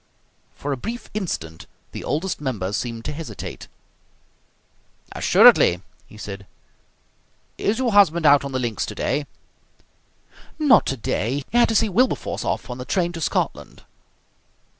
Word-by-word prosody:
For 145 - -4
a - - -4
brief 230 - -7
instant 80 - -5 0.2
the - - -7
Oldest 160 +3 -2
Member 105 -9 -3
seemed 115 0 -4
to - - -3
hesitate. 160 +1 -7 1.4
"Assuredly!" 90 +1 +5 0.2
he 110 - -15
said. 100 -2 -8 1.1
"Is 210 +2 0
your 250 -2 0
husband 170 -5 +4
out 145 -1 +6
on 140 - -5
the 130 - -1
links 120 -4 -2
today?" 135 +7 -2 1.3
"Not 300 -5 +5
today. 135 +1 -2
He - - -6
had - - +5
to 225 - 0
see 215 - +4
Wilberforce 245 +7 0
off - - -2
on 125 0 -7
the - - -4
train 175 +2 0
to 165 -1 -7
Scotland." - - -2
145 Hz, 140 wpm, -22 LUFS, 115-195 Hz, 1.4 s, out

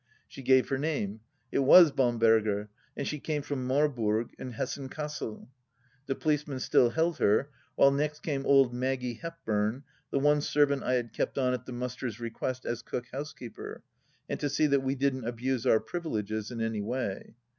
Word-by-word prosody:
She - - -10
gave 130 0 +4
her 135 - 0
name. 135 -9 -2 0.3
It - - +1
was 155 +4 +8
Bamberger, 115 -5 +2 0.3
and 140 - -2
she 150 - -3
came 150 0 -2
from 135 -3 -3
Marburg 120 -6 +1
in 125 - -6
Hessen 135 +3 -4
Cassel. 150 -7 -5 0.6
The 135 - -1
policeman 150 -3 -1
still 125 -1 +4
held 165 +4 0
her, 110 +8 +3 0.2
while 140 - +6
next 150 +2 -1
came 140 -4 -2
old 135 -3 +5
Maggie 125 -1 -2
Hepburn, 125 -7 -2 0.3
the - - -1
one 145 +1 +3
servant 145 -2 +2
I 130 - 0
had 120 -2 -2
kept - - -2
on 130 -2 +2
at 125 -1 -5
the - - -6
Musters' 125 -2 -4
re 115 -1 -4
quest 130 +2 -4
as 120 -1 -2
cook 125 +1 -5
housekeeper, 135 -3 -7 0.4
and - - -3
to 145 - -1
see 155 - +2
that 140 -2 +3
we 135 +1 -1
didn't 130 -3 0
abuse 125 +1 -2
our 110 - +5
privileges 110 - -3
in 120 -2 -5
any 110 -2 -1
way. 110 -2 -4
130 Hz, 180 wpm, -29 LUFS, 115-145 Hz, 0.6 s, was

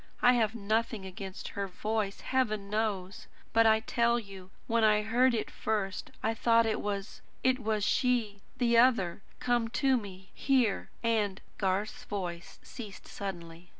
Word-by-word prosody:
I 245 0 +7
have 225 -2 +1
nothing 220 -1 -1
against 190 0 -7
her 200 -1 -3
voice, 210 +2 -2
Heaven 215 -6 -1
knows! 205 -3 -2 0.3
But 225 0 +6
I 220 0 +5
tell 235 +1 +2
you, 195 -4 -9 0.2
when 230 0 +1
I 210 -1 +4
heard 240 +3 +3
it 220 - -3
first 205 -3 -2
I 225 - +1
thought 230 0 +4
it 220 - 0
was 200 -1 -4 0.2
it 260 0 +3
was 215 -3 -1
she 225 -4 +1 0.2
the 235 -2 +4
other 225 -8 +3 0.2
come 240 -2 +1
to 265 +3 +2
me 190 -4 -9
here 255 -8 +1
and 215 -4 +1
" - - -35
Garth's 205 +5 -1
voice 180 -6 -5
ceased 215 -5 -9
suddenly. 175 -3 -7
215 Hz, 155 wpm, -30 LUFS, 195-235 Hz, 0.3 s, I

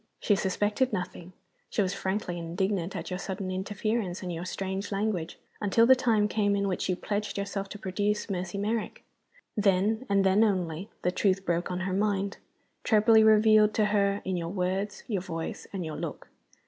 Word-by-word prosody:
She 205 - +3
suspected 205 +6 0
nothing 180 -2 -5 0.4
she 205 - +1
was 185 0 -1
frankly 190 -2 -2
indignant 180 +2 -2
at - - -5
your 180 - -2
sudden 190 -1 -4
interference 195 0 -2
and 180 -1 -3
your 170 +2 -5
strange 190 +2 -4
language 195 -5 -2 0.2
until 210 +3 +4
the 260 +2 +7
time 225 -5 +2
came 205 -1 +1
in 200 0 0
which 190 0 -2
you 185 - +2
pledged 205 +3 -3
yourself 200 0 -3
to 205 - -7
produce 205 +2 -1
Mercy 185 -1 -3
Merrick. 215 +2 -2 0.5
Then 210 +3 +2
(and 200 -1 +3
then 195 +3 +4
only) 185 -3 -1
the 180 - +2
truth 190 +1 +1
broke 170 0 0
on 180 0 -3
her 185 0 -2
mind, 200 0 0 0.5
trebly 220 0 +5
revealed 215 0 +5
to 215 - +3
her 200 -1 +2
in 185 - -1
your 165 -1 -3
words, 190 +2 -2
your 200 -6 -1
voice, 165 -3 -5
and 190 -4 -4
your 155 -1 -5
look. - - -6
195 Hz, 180 wpm, -28 LUFS, 185-210 Hz, 0.5 s, the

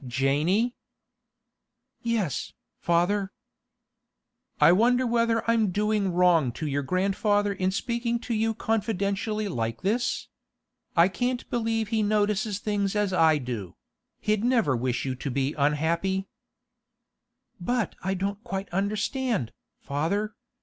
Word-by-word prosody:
'Janey.' 145 - +1 1.3
'Yes, 225 - -1 0.3
father.' 190 +4 +1 1.3
'I 150 +2 +7
wonder 245 +7 +4
whether 230 -1 +1
I'm 230 -3 +3
doing 210 0 +1
wrong 175 -7 +4
to 155 - -5
your 145 -1 0
grandfather 200 +6 +1
in 185 -1 0
speaking 235 +3 -1
to 240 - -3
you 225 0 +1
confidentially 210 -1 -1
like 115 - -3
this? 235 +6 0 0.7
I 170 0 +6
can't 245 +7 -2
believe 225 -2 0
he 225 -1 +1
notices 210 0 +1
things 205 -1 -1
as 205 -2 +1
I 160 -3 +5
do; 120 - -5 0.4
he'd 215 0 0
never 230 - +3
wish 125 +2 -1
you 130 - -1
to 130 +2 -5
be 135 +2 0
unhappy.' 165 +6 0 1.3
'But 230 +4 -1
I 190 +1 0
don't 200 +3 -3
quite 195 0 -4
understand, 210 - -1 0.3
father. 170 +10 -1
200 Hz, 120 wpm, -26 LUFS, 165-220 Hz, 1.3 s, I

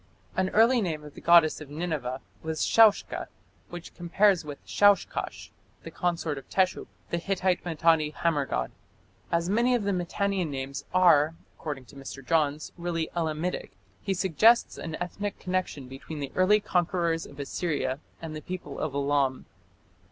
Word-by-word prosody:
An 190 0 +1
ancient 230 +2 +5
name 155 -4 -3
of 150 -1 -11
the - - -12
goddess 170 -2 +5
of 150 - -9
Nineveh 145 -5 -3 0.2
was 160 -1 -1
Shaushka, 220 -2 +4 0.4
which 175 -1 -9
compares 180 +2 +2
with 145 -2 -9
Shaushkash, 205 -1 +1 0.3
the - - -8
consort 170 -5 -1
of 135 - -18
Teshup, 185 -1 +1 0.2
the 170 - 0
Hittite 185 0 0
Mitanni 160 -2 +2
hammer 150 -2 0
god. 60 0 -2 0.6
As 170 0 +1
many 235 +6 +3
of 235 - -1
the 200 - 0
Mitannian 185 0 -1
names 135 0 -5
"are", 165 -4 +5 0.2
according 145 -5 -6
to - - -16
Mr. 135 -1 -9
Johns, 150 -1 +1
"really 170 -2 -2
Elamitic", 165 - -2 0.3
he 195 - -1
suggests 210 +6 +4
an 160 -1 -5
ethnic 200 +3 -4
connection 180 -7 -3
between 135 +4 -8
the 140 -2 -4
early 195 +3 +4
conquerors 175 -3 0
of 140 - -14
Assyria 140 -2 -2 0.2
and 160 -1 -5
the 155 - -6
people 175 -6 -6
of 150 -3 -3
Elam. 140 -2 +1
165 Hz, 155 wpm, -27 LUFS, 145-185 Hz, 0.6 s, ancient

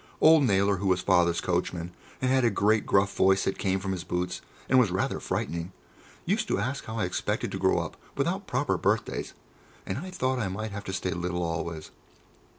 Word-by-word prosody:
Old 155 -2 +7
Naylor, 100 -2 +3
who 100 +2 -2
was 90 -1 +2
Father's 85 -3 +3
coachman, 90 -1 -2 0.3
and 130 - +2
had 130 -1 +3
a 120 - +5
great 105 +1 +2
gruff 100 0 +3
voice 95 0 +4
that 95 - -2
came 95 -1 +1
from 95 0 -3
his 90 -2 -3
boots 90 0 -3 0.3
and 130 - +5
was 120 -6 +4
rather 95 +2 -1
frightening, 85 +2 -3 0.5
used - - 0
to - - +1
ask 130 +7 -2
how 110 +1 -5
I 105 - +1
expected 90 - -2
to - - -4
grow - - +3
up - - -3 0.2
without - - -1
proper - - 0
birthdays, - - -1 0.5
and 95 - -3
I 185 +5 -6
thought 130 -8 -1
I 110 - 0
might 110 +3 -4
have 100 +1 -6
to 95 - -4
stay 90 0 -2
little 90 0 -2
always. 80 -1 -4
95 Hz, 205 wpm, -28 LUFS, 90-110 Hz, 0.5 s, Old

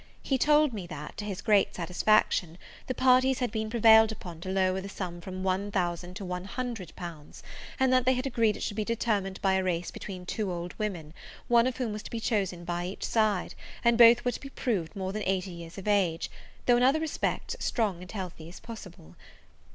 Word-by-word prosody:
He 265 -2 0
told 300 -1 +4
me 195 -5 -5
that, 150 -3 -8
to 210 - -4
his 200 -2 -5
great 210 -3 +3
satisfaction, 180 -1 +2 0.3
the 255 - -2
parties 255 0 +4
had 245 -4 -1
been 220 0 -2
prevailed 220 -1 +6
upon 175 -6 -9
to 185 - -5
lower 190 0 +1
the 195 - -7
sum 175 -3 -6
from 185 +1 -6
one 190 +2 0
thousand 175 -2 -2
to 200 -1 -6
one 180 0 -4
hundred 230 -5 -5
pounds; 165 -4 -9 0.4
and 265 -1 +3
that 255 -1 +4
they 260 +1 +4
had 255 +2 -2
agreed 230 -5 +1
it - - -6
should 205 - -3
be 215 - +1
determined 210 -4 -1
by 190 -1 +3
a 190 0 +2
race 180 -1 -1
between 185 -3 -7
two 200 +1 -2
old 175 0 -5
women, 175 -8 -4 0.3
one 235 0 +5
of 255 - -3
whom 240 -5 -2
was 210 - -5
to - - -9
be 230 - -4
chosen 195 -6 -1
by 175 0 -2
each 190 - -7
side, 215 -4 +1 0.3
and 235 -1 +5
both 235 +1 +7
were 245 - +2
to - - -7
be 275 - -8
proved 215 - -2
more 190 -1 -3
than 215 - -3
eighty 190 0 0
years 170 +1 -10
of 195 - -7
age, 185 -6 +1 0.3
though, 245 -1 +5
in - - +1
other 270 +5 +4
respects 320 +9 -2
strong 205 -7 -1
and 180 - -9
healthy 180 -5 -6
as 180 - -11
possible. 185 - -11
200 Hz, 220 wpm, -29 LUFS, 180-230 Hz, 0.4 s, both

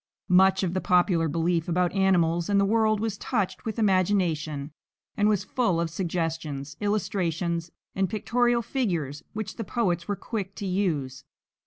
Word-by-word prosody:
Much 190 +1 +5
of 175 -2 -1
the 185 - -1
popular 175 -2 +3
belief 165 +2 0
about 180 +1 +1
animals 175 -3 +2
and 200 -1 +3
the 200 - +3
world 215 0 +2
was 215 -2 -3
touched 195 -6 -2
with 220 -1 -3
imagination 175 -8 +1 0.4
and 210 +1 +3
was 210 -3 +1
full 225 -10 0
of 170 -1 -1
suggestions, 165 -5 -3
illustrations, 175 -5 -1 0.2
and 190 -1 0
pictorial 240 +3 +1
figures 175 - -2
which 215 -1 -5
the 225 - -3
poets 180 -5 -1
were 205 - -1
quick 200 -2 -5
to 205 - -5
use. 155 -9 -1
185 Hz, 155 wpm, -26 LUFS, 165-205 Hz, 0.4 s, Much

